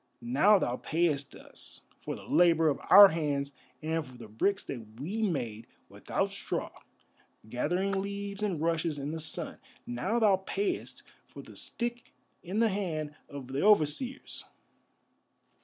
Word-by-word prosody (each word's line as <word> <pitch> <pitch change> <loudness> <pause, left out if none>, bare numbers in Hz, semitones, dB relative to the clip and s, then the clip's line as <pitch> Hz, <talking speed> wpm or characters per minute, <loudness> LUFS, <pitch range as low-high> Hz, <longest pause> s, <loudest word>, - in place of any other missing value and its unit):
Now 145 - +5
thou 125 -9 -1
payest 155 -4 0
us - - -6 0.2
for - - -5
the - - -11
labour 165 -2 +4
of 145 - -1
our 200 0 +11
hands 145 -4 -1 0.3
and 160 +1 0
for 130 -4 -13
the 115 -2 -10
bricks 195 - 0
that 110 -2 -8
we 195 +11 -3
made 120 - -2 0.2
without - - -2
straw, - - -4 0.8
gathering 175 - 0
leaves 200 +1 -3
and 195 -7 -1
rushes 165 -1 0
in 140 +1 -4
the 160 - -4
sun. 155 - -3 0.3
Now 155 - -1
thou 210 -5 +5
payest 370 - -3 0.2
for - - -11
the - - -14
stick 240 0 -4 0.3
in 185 +4 -5
the 230 0 +4
hand 160 -7 -3 0.2
of 140 -3 -8
the 135 +2 -2
overseers. 210 - +2
165 Hz, 145 wpm, -30 LUFS, 140-200 Hz, 0.8 s, our